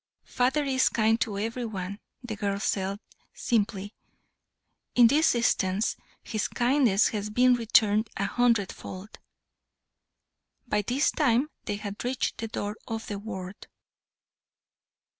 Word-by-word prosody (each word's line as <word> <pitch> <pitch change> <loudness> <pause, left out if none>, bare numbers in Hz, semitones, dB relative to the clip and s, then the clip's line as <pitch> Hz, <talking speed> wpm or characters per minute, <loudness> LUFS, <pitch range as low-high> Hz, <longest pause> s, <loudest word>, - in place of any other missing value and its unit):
"Father 260 +4 +1
is 265 -2 +2
kind 225 +1 +2
to 205 -3 -1
every 230 +4 -3
one," 200 -3 -5 0.2
the 225 -3 -5
girl 200 -1 -2
said, 195 -1 -1 0.4
simply. 205 -3 -1 1.0
"In 245 - +7
this 290 +4 +4
instance 205 -3 +1 0.3
his 215 -2 -2
kindness 240 -5 +3
has 210 -1 -3
been 250 +4 +4
returned 220 -2 +3
a 195 - 0
hundred 230 -2 +2
fold." 190 +4 -10 1.5
By 210 -4 0
this 250 +8 +1
time 275 0 +2
they 205 - -2
had 205 0 -6
reached 250 +1 -2
the 225 - -3
door 210 -1 -4
of 225 -1 -4
the 205 -1 -5
ward. 190 -3 -7
220 Hz, 125 wpm, -27 LUFS, 205-245 Hz, 1.5 s, In